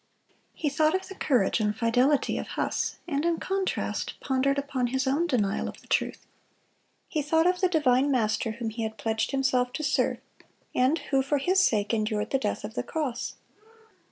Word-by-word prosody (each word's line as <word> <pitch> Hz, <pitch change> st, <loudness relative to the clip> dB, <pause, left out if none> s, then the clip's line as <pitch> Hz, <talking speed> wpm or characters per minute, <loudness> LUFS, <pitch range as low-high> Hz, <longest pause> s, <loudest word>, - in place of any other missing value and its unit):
He 310 Hz, -, -2 dB
thought 310 Hz, +4 st, +2 dB
of 375 Hz, -, -2 dB
the -, -, -8 dB
courage 245 Hz, -, +1 dB
and 210 Hz, -1 st, 0 dB
fidelity 250 Hz, +5 st, +2 dB
of -, -, -5 dB
Huss, -, -, -1 dB
and 290 Hz, -3 st, -1 dB
in 335 Hz, -1 st, +1 dB
contrast 385 Hz, 0 st, -2 dB
pondered 275 Hz, +1 st, +1 dB
upon 270 Hz, -3 st, -1 dB
his 265 Hz, +2 st, -1 dB
own 290 Hz, +6 st, +1 dB
denial 210 Hz, -9 st, 0 dB
of -, -, -11 dB
the -, -, -21 dB
truth. -, -, -1 dB, 0.8 s
He 310 Hz, -, -1 dB
thought 320 Hz, +3 st, +2 dB
of 360 Hz, +1 st, +2 dB
the 370 Hz, -, +4 dB
divine 285 Hz, -5 st, +3 dB
Master 220 Hz, -3 st, +1 dB
whom 230 Hz, -1 st, -4 dB
he 230 Hz, +2 st, -5 dB
had 220 Hz, 0 st, -3 dB
pledged 220 Hz, +1 st, -1 dB
himself 255 Hz, -2 st, +1 dB
to 310 Hz, -, -4 dB
serve, 285 Hz, -1 st, +1 dB, 0.6 s
and 260 Hz, +6 st, +3 dB, 0.2 s
who 270 Hz, -, +5 dB
for 280 Hz, +2 st, 0 dB
his 365 Hz, +8 st, +2 dB
sake 210 Hz, -, +1 dB
endured 215 Hz, -1 st, -1 dB
the 270 Hz, -, +2 dB
death 210 Hz, -, -2 dB
of 210 Hz, +1 st, -6 dB
the -, -, -1 dB
cross. 275 Hz, -7 st, -3 dB
265 Hz, 185 wpm, -27 LUFS, 230-305 Hz, 0.8 s, who